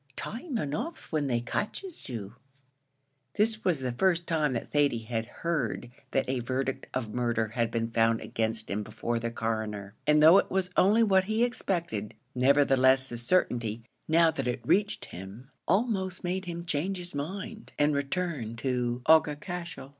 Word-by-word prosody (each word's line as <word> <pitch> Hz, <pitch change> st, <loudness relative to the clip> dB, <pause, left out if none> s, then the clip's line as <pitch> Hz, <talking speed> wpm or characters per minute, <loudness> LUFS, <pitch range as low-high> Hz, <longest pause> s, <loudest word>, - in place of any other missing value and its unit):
Time 250 Hz, -, -4 dB
enough 160 Hz, -, -4 dB
when 150 Hz, -3 st, 0 dB
they 120 Hz, -2 st, +1 dB
catches 260 Hz, -, -4 dB
you." 110 Hz, -4 st, -6 dB, 1.0 s
This 220 Hz, +1 st, +2 dB
was 170 Hz, -7 st, +1 dB
the 130 Hz, -1 st, -1 dB
first 175 Hz, +6 st, +2 dB
time 155 Hz, -5 st, +1 dB
that 115 Hz, -, -4 dB
Thady 140 Hz, -6 st, +2 dB
had 115 Hz, 0 st, -3 dB
heard 130 Hz, -7 st, -2 dB, 0.2 s
that 135 Hz, -, 0 dB
a 130 Hz, 0 st, 0 dB
verdict 130 Hz, +2 st, -2 dB
of 115 Hz, -5 st, -3 dB
murder 120 Hz, -3 st, 0 dB
had 115 Hz, 0 st, 0 dB
been 115 Hz, 0 st, -1 dB
found 115 Hz, 0 st, +2 dB
against 110 Hz, -1 st, -2 dB
him 105 Hz, +2 st, -1 dB
before 115 Hz, +2 st, -3 dB
the 115 Hz, 0 st, -2 dB
Coroner, 110 Hz, -3 st, -3 dB
and 150 Hz, 0 st, +5 dB
though 160 Hz, +5 st, +8 dB
it -, -, -1 dB
was 185 Hz, -1 st, 0 dB
only 215 Hz, +5 st, +5 dB
what 190 Hz, -3 st, +4 dB
he 220 Hz, +3 st, +1 dB
expected, 170 Hz, -, -2 dB, 0.2 s
nevertheless 130 Hz, 0 st, +4 dB
the 120 Hz, -, -5 dB
certainty, 120 Hz, -5 st, 0 dB, 0.2 s
now 165 Hz, +1 st, +5 dB
that 135 Hz, -5 st, -3 dB
it 125 Hz, -, -3 dB
reached 205 Hz, +2 st, +2 dB
him, 100 Hz, +9 st, -10 dB, 0.2 s
almost 190 Hz, -2 st, 0 dB
made 185 Hz, +2 st, -2 dB
him 170 Hz, -1 st, -5 dB
change 170 Hz, +5 st, -1 dB
his 175 Hz, 0 st, -7 dB
mind 190 Hz, +9 st, -5 dB
and 150 Hz, +1 st, +3 dB
return 140 Hz, -5 st, -2 dB
to 125 Hz, 0 st, -1 dB
Aughacashel. 160 Hz, 0 st, +1 dB
140 Hz, 160 wpm, -29 LUFS, 115-180 Hz, 1.0 s, though